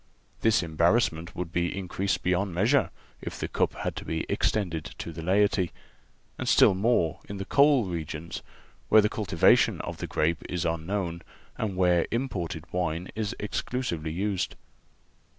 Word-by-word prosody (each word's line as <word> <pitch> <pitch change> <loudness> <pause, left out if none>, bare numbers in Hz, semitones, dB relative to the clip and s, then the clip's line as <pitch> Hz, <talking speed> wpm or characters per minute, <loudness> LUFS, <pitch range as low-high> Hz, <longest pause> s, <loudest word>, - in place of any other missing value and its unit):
This 110 -4 +3
embarrassment 85 +1 +1
would 85 -2 -4
be 85 +2 -1
increased 95 +1 -2
beyond 90 0 0
measure 120 +10 +3 0.3
if - - -6
the - - -2
cup - - 0
had - - -3
to - - -5
be 80 0 -2
extended 85 -7 0
to 85 - -5
the 80 +1 -7
laity, 95 0 +2 0.7
and - - -1
still - - +6
more 95 -5 +1
in 100 - -5
the 95 - -4
coal 140 0 +4
regions, 85 -2 -5 0.5
where 110 - +8
the 105 - +2
cultivation 90 -7 +3
of - - -6
the - - -5
grape 80 +2 0
is 90 -1 -2
unknown 85 +1 -2 0.3
and 105 -4 -2
where 90 -2 +3
imported 90 - -3
wine 90 0 -1
is 110 +1 -2
exclusively 105 -6 -3
used. 95 +2 -1
90 Hz, 150 wpm, -27 LUFS, 85-105 Hz, 0.7 s, where